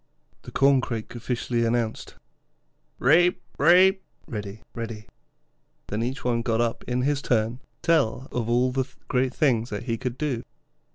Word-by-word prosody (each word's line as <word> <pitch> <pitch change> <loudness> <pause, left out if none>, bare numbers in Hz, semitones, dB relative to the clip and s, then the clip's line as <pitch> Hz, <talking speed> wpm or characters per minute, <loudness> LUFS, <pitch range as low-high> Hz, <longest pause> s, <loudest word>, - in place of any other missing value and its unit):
The - - -10
Corncrake 130 -5 +2
officially 120 0 -1
announced, 115 -1 -1 0.8
'Raip, 175 +7 +5 0.2
raip' 185 +5 +6 0.2
(ready, 105 -1 -6
ready). 115 -2 -6 0.8
Then 105 +2 -2
each 125 +1 -3
one 120 -1 +1
got 115 -1 0
up 120 -1 0
in 125 0 0
his 140 0 +1
turn 115 -2 +1
to - - -34 0.2
tell 140 -7 +2
of 115 -2 -2
all 125 +2 +3
the 130 0 0 0.2
great 130 0 +1
things 120 -5 +2
he 115 +2 -3
could 125 -1 -3
do. 140 -6 -1
125 Hz, 145 wpm, -25 LUFS, 115-135 Hz, 0.8 s, raip